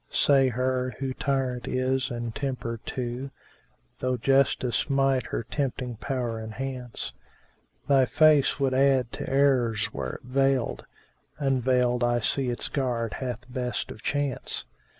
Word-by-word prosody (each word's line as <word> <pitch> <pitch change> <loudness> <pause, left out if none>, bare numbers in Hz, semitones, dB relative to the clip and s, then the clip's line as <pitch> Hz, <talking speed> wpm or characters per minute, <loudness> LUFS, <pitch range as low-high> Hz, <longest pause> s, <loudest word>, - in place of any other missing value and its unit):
Say 135 -2 +4
her, 130 +1 -1
who 135 -1 -2
tyrant 130 -3 -1
is 130 +1 0
and 120 -2 -4
tempter 125 -4 -3
too 125 +2 -3 0.4
* - - -40
(Though 130 0 0
justice 135 0 +2
might 135 -2 +2
her - - -3
tempting 125 -2 -3
power 120 -3 -2
enhance):— 125 - -5 0.7
Thy 135 -2 +5
face 150 0 +4
would 135 -1 +1
add 130 -3 +3
to - - -5
errors 130 -6 +2
were 65 - -3
it - - -9
veiled; 135 0 0 0.3
* - - -43
Unveiled 125 -3 +2
I 120 0 +2
see 130 +3 0
its 120 - -2
guard 120 -5 -1
hath 120 -2 -4
best 125 -1 -2
of - - -10
chance! 145 -2 -1
130 Hz, 140 wpm, -27 LUFS, 120-135 Hz, 0.7 s, Thy